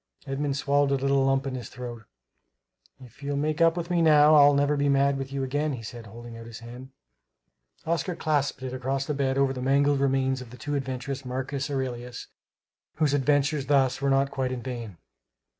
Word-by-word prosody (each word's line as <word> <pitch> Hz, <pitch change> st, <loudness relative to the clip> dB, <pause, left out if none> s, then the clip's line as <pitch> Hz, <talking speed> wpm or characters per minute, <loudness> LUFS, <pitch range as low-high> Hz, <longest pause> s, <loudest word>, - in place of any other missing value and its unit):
Edmund 140 Hz, 0 st, -2 dB
swallowed 140 Hz, 0 st, +2 dB
a 140 Hz, -, +2 dB
little 135 Hz, 0 st, +2 dB
lump 135 Hz, +1 st, +1 dB
in 135 Hz, -, -3 dB
his 125 Hz, -2 st, -6 dB
throat. 120 Hz, -3 st, -8 dB, 1.0 s
"If 130 Hz, +4 st, -19 dB
you'll 140 Hz, 0 st, -2 dB
make 150 Hz, +2 st, -1 dB
up 165 Hz, +1 st, +4 dB
with 175 Hz, 0 st, -4 dB
me, 175 Hz, -1 st, +2 dB
now, 150 Hz, -1 st, +6 dB
I'll 145 Hz, -1 st, +7 dB
never 145 Hz, +1 st, +2 dB
be 145 Hz, 0 st, +1 dB
mad 140 Hz, 0 st, +3 dB
with 135 Hz, 0 st, -5 dB
you 140 Hz, -1 st, -2 dB
again," 145 Hz, +1 st, -1 dB
said 115 Hz, 0 st, -9 dB
he, -, -, -13 dB
holding 120 Hz, 0 st, -10 dB
out 115 Hz, 0 st, -10 dB
his 115 Hz, -2 st, -9 dB
hand. 125 Hz, +3 st, -10 dB, 1.0 s
Oscar 170 Hz, +2 st, -1 dB
clasped 145 Hz, -4 st, -1 dB
it 130 Hz, -1 st, -4 dB
across 135 Hz, +1 st, -2 dB
the 150 Hz, -, -2 dB
bed 135 Hz, -1 st, 0 dB
over 135 Hz, -1 st, +2 dB
the 130 Hz, -, -6 dB
mangled 140 Hz, +2 st, +3 dB
remains 135 Hz, -1 st, +1 dB
of 125 Hz, -, -10 dB
the 125 Hz, -, -12 dB
too 145 Hz, -, -4 dB
adventurous 135 Hz, 0 st, -3 dB
Marcus 135 Hz, +2 st, -3 dB
Aurelius, 125 Hz, -3 st, -4 dB, 0.7 s
whose 150 Hz, -3 st, +1 dB
adventures, 145 Hz, 0 st, +1 dB
thus, 135 Hz, -2 st, +2 dB
were 140 Hz, -, +1 dB
not 135 Hz, 0 st, +2 dB
quite 130 Hz, -1 st, -2 dB
in 125 Hz, -2 st, -5 dB
vain. 120 Hz, -7 st, -6 dB
135 Hz, 200 wpm, -26 LUFS, 130-145 Hz, 1.0 s, I'll